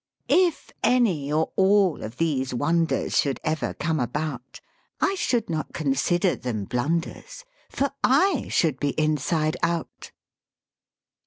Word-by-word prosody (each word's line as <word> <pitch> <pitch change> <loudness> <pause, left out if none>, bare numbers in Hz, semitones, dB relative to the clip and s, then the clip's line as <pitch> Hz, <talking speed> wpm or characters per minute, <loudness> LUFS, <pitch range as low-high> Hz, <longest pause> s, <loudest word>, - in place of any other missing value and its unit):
If 360 -3 +2
any 185 - +2
or 155 +1 +1
all 195 -3 +3
of 110 +3 -7
these 135 -6 -1
wonders 165 +5 +1
Should 140 -2 0
ever 155 0 -2
come 160 -1 -1
about, 135 0 -4 0.4
I 390 - +2
should 245 - 0
not 160 -2 -4
consider 170 +5 +1
them 110 -5 -4
blunders, 165 - -3 0.2
For 280 0 -1
I 295 +4 +3
should 150 -6 +1
be 145 +1 -1
inside 155 +2 0
out! 170 -1 -3
160 Hz, 125 wpm, -25 LUFS, 140-195 Hz, 0.4 s, all